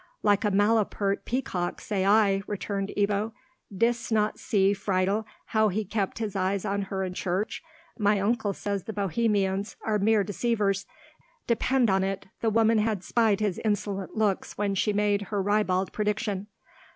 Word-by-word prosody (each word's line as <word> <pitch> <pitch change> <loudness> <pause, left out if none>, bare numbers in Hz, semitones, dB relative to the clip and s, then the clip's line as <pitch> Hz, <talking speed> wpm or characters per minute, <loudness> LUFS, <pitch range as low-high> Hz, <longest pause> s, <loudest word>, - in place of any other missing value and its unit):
"Like 205 0 +3
a 210 - +2
malapert 205 -1 +1
peacock, 190 -8 -2
say 200 -4 -2
I," 200 -2 +4
returned 200 -1 -3
Ebbo; 205 +2 +1 0.4
"didst 230 +4 0
not 215 -1 +1
see, 195 -1 +2
Friedel, 200 +2 0 0.2
how 220 -1 +2
he 210 +2 -1
kept 200 -1 -2
his 215 -3 -3
eyes 190 0 0
on 200 +1 0
her 195 -1 -3
in 185 -1 -3
church? 185 +3 -2 0.4
My 205 -1 +3
uncle 205 0 0
says 200 -1 -3
the 220 - -5
Bohemians 200 0 0
are 215 -1 +1
mere 210 +1 +3
deceivers. 200 0 0 0.6
Depend 240 -1 +2
on 190 0 +2
it 195 0 -3 0.2
the 225 - +2
woman 225 0 +3
had 210 -3 0
spied 220 0 +2
his 205 -4 0
insolent 205 -2 -2
looks 210 -3 0
when 205 -1 0
she 205 +2 +1
made 205 0 +1
her 205 - -1
ribald 195 -2 +1
prediction." 210 -1 -2
205 Hz, 160 wpm, -27 LUFS, 195-215 Hz, 0.6 s, I